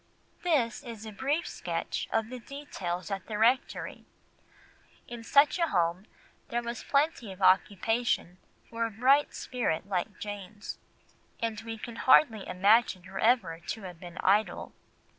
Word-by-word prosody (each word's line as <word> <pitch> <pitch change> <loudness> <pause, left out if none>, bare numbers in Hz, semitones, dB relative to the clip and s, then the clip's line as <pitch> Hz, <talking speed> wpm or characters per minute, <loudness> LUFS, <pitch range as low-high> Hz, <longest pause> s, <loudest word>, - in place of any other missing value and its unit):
This 285 -10 +1
is 230 -4 -8
a 220 - -6
brief 280 - -1
sketch - - -3
of 225 +1 0
the 255 - -6
details 195 - -5
at 195 -1 -4
the 215 - -3
rectory. 240 +4 +1 1.0
In 240 -1 -8
such 285 +8 +4
a 335 - +3
home 175 - 0 0.4
there 240 0 -2
was 235 0 -5
plenty 280 -7 +1
of 190 - -11
occupation 190 0 +2 0.3
for 230 0 -1
a - - -6
bright 260 +7 +3
spirit 240 -10 -2
like 195 +2 -2
Jane's, 205 -1 -7 0.6
and 225 -2 -2
we 225 0 -6
can 230 +1 -8
hardly 230 -6 +5
imagine 195 +1 +3
her 190 +2 -7
ever 225 -9 +2
to 200 +5 -6
have 180 -3 -8
been 175 0 -10
idle. 205 +3 +2
225 Hz, 145 wpm, -29 LUFS, 190-245 Hz, 1.0 s, hardly